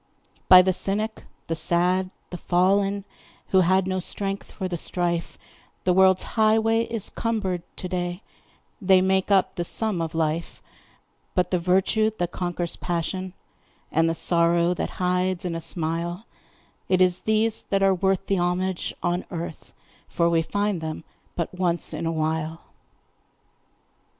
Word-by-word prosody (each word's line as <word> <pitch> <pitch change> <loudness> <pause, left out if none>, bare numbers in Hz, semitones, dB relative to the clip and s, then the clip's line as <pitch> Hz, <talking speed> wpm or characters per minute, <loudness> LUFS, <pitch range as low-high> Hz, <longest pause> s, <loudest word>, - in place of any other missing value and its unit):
By 185 0 +10
the 185 0 +2
cynic, 215 +4 -2 0.2
the 165 - -2
sad, 180 +3 +1 0.2
the 180 - -5
fallen, 195 +2 +1 0.4
Who 190 - +4
had 185 +1 +3
no 185 0 -1
strength 195 +2 -2
for 190 - -4
the 180 - -3
strife, 170 0 -1 0.5
The 180 - +3
world's 190 0 +5
highway 225 +1 +2
is 230 -4 -2
cumbered 205 -6 -2
to 185 - -5
day 180 +1 -3 0.6
They 190 -1 +5
make 190 +1 +1
up 195 -2 +3
the 175 - -3
sum 205 0 0
of 160 -1 -4
life; 160 +1 -2 0.8
But 180 -1 +1
the 180 - +2
virtue 190 +5 +2
that 175 0 -2
conquers 175 -1 -3
passion, 180 +2 -3 0.6
And 165 +1 +2
the 165 - -1
sorrow 170 +1 +3
that - - -3
hides 180 0 0
in 175 - -2
a 165 - -4
smile 170 +4 -2 0.6
It 185 - +3
is 180 -1 +3
these 220 0 +1
that 195 0 0
are 195 0 +5
worth 190 +1 0
the 195 -2 0
homage 180 +1 -1
on 175 +1 0
earth, 170 -2 -7 0.3
For 170 - +1
we 165 -1 +3
find 205 +1 -1
them 160 0 -5 0.3
but 170 0 -3
once 175 -2 -1
in 160 +2 -3
a - - 0
while. 160 0 -2
180 Hz, 150 wpm, -24 LUFS, 170-190 Hz, 0.8 s, By